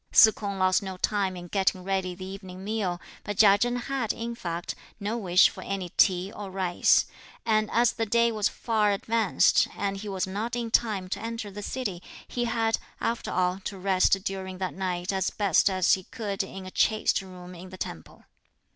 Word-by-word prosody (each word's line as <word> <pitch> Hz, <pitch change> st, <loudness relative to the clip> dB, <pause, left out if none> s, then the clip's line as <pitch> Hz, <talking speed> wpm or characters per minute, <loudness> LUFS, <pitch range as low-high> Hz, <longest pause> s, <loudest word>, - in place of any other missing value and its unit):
Se 220 Hz, -, +8 dB
K'ung 200 Hz, -2 st, -5 dB
lost 185 Hz, 0 st, +3 dB
no 190 Hz, -2 st, -6 dB
time 195 Hz, -1 st, 0 dB
in 175 Hz, -, -8 dB
getting 190 Hz, 0 st, 0 dB
ready 190 Hz, -1 st, -1 dB
the 185 Hz, +1 st, -8 dB
evening 190 Hz, -1 st, -8 dB
meal, 200 Hz, -4 st, -2 dB, 0.2 s
but 205 Hz, -2 st, -4 dB
Chia 205 Hz, -2 st, +7 dB
Chen 245 Hz, +2 st, +1 dB
had, 245 Hz, -1 st, -1 dB
in 235 Hz, +1 st, -4 dB
fact, 175 Hz, -6 st, -4 dB, 0.3 s
no 210 Hz, +2 st, -2 dB
wish 185 Hz, -5 st, +5 dB
for -, -, -9 dB
any 195 Hz, -3 st, -4 dB
tea 185 Hz, +1 st, +2 dB
or 205 Hz, -2 st, -7 dB
rice; 185 Hz, -2 st, +3 dB, 0.4 s
and, 215 Hz, -2 st, +2 dB
as 235 Hz, 0 st, +3 dB
the 225 Hz, -, -2 dB
day 235 Hz, +2 st, +3 dB
was 215 Hz, -2 st, +1 dB
far 215 Hz, -3 st, +1 dB
advanced 220 Hz, 0 st, +3 dB
and 195 Hz, -1 st, -1 dB
he 205 Hz, +1 st, -6 dB
was 190 Hz, -2 st, -1 dB
not 210 Hz, +5 st, -3 dB
in 235 Hz, -2 st, -3 dB
time 210 Hz, -6 st, +1 dB
to -, -, -3 dB
enter 230 Hz, -2 st, -5 dB
the 205 Hz, +1 st, -7 dB
city, 205 Hz, -6 st, -4 dB, 0.3 s
he 240 Hz, -1 st, -2 dB
had, 225 Hz, -1 st, +1 dB, 0.2 s
after 230 Hz, 0 st, -2 dB
all, 180 Hz, +1 st, 0 dB
to 195 Hz, 0 st, -6 dB
rest 190 Hz, 0 st, +2 dB
during 190 Hz, -2 st, -4 dB
that 185 Hz, 0 st, -3 dB
night 180 Hz, 0 st, -2 dB
as 190 Hz, 0 st, 0 dB
best 200 Hz, -4 st, +2 dB, 0.3 s
he 190 Hz, -, +1 dB
could 205 Hz, -5 st, -3 dB
in 190 Hz, 0 st, -7 dB
a 185 Hz, -, -8 dB
"chaste" 215 Hz, 0 st, +2 dB
room 180 Hz, -1 st, -11 dB
in 180 Hz, +1 st, -10 dB
the 185 Hz, -, -10 dB
temple. 80 Hz, -, -7 dB
195 Hz, 195 wpm, -27 LUFS, 185-220 Hz, 0.4 s, Se